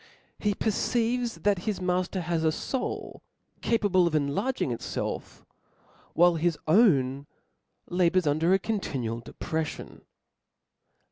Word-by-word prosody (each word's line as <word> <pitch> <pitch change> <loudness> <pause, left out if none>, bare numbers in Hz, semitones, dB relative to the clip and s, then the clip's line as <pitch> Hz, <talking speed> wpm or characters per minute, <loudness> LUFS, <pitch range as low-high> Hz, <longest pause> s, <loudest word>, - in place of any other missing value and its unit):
He 205 -2 0
perceives 235 +3 0
that 205 -3 +3
his 210 - -2
mafter 180 +1 -1
has 165 -1 -1
a 160 - +3
foul, 255 - -4 0.4
capable 200 -6 +3
of 160 - -1
enlarging 150 - 0
itfelf; 115 - -4 0.7
while, 175 0 +5
his 165 0 +1
own 145 - +3 0.3
' - - -52 0.2
labours 180 0 +2
under 155 +4 +2
a 190 - +6
continual 135 - -3
depreflion. 160 +6 -5
175 Hz, 115 wpm, -27 LUFS, 155-205 Hz, 0.7 s, a